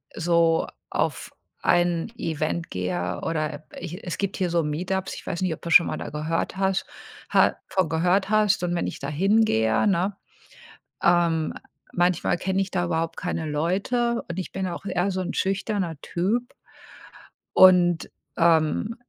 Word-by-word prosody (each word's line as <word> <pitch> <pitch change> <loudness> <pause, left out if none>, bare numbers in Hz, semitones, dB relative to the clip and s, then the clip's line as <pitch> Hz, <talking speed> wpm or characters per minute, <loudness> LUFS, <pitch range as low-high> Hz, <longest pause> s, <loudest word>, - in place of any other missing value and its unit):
so 165 -1 +2 0.2
auf - - -2 0.3
ein 175 +4 +1
Event 165 -3 -2
gehe 90 -1 -2
oder, 155 -2 -1 0.2
äh, - - -10
ich 175 +4 -7
es 175 - -3
gibt 200 -1 -2
hier 185 -2 0
so 170 -1 +1
Meetups, 185 +5 -2
ich - - -11
weiß 170 - -3
nicht, 185 -3 0
ob - - -10
das 170 - -1
schon 170 - +8
mal - - -3
da - - -6
gehört 155 +4 -2
hast, 190 0 0 0.4
ha - - +4
von 185 -4 0
gehört 180 +5 +1
hast 210 -4 +3
und 175 0 0
wenn 175 - -1
ich - - -6
da - - -4
hingehe, 160 - +2
ne, 195 0 +1 0.9
ähm, 170 -2 +2 0.4
manchmal 175 0 +1
kenne 190 +2 -1
ich 195 - -2
da 180 -2 0
überhaupt 165 -1 -2
keine 170 -3 -3
Leute 200 +10 0
und 170 +2 -3
ich 185 - -6
bin 190 0 -3
auch 180 +1 -5
eher 190 0 0
so 185 - -2
‘n 185 - -3
schüchterner 195 -4 -1
Typ 215 +11 -2 1.0
und, 180 -2 +6 0.3
ähm, 165 +6 +2
175 Hz, 165 wpm, -25 LUFS, 165-190 Hz, 1.0 s, schon